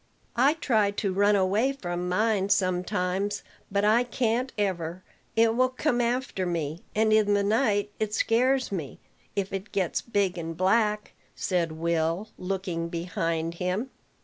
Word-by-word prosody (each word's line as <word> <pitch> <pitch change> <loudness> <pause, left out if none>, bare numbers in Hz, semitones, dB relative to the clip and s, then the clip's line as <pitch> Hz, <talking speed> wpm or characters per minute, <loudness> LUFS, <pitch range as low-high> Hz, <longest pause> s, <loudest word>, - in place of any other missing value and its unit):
"I 270 +6 +4
try 220 -10 +2
to 200 -1 -2
run 205 +2 +4
away 205 +8 +2
from 180 -8 -4
mine 205 0 +1
sometimes, 185 +2 0 0.3
but 200 +1 +1
I 225 +3 +5
can't 245 +1 0
ever. 185 -3 -2 0.3
It 225 0 +4
will 255 +1 +3
come 255 -1 0
after 240 -4 -1
me; 165 -2 -2
and 215 0 +3
in 210 -1 +4
the 200 - +2
night 205 -1 +1
it 215 -1 -1
scares 255 +4 +2
me, 165 -8 -4 0.4
if 195 -1 -2
it 195 +2 -5
gets 185 -4 0
big 200 -6 0
and 165 -1 -5
black," 210 +3 +1 0.2
said 170 -4 0
Will, 165 +4 -1
looking 180 -3 -3
behind 165 -1 -2
him. 190 +9 -1
200 Hz, 150 wpm, -27 LUFS, 180-225 Hz, 0.4 s, I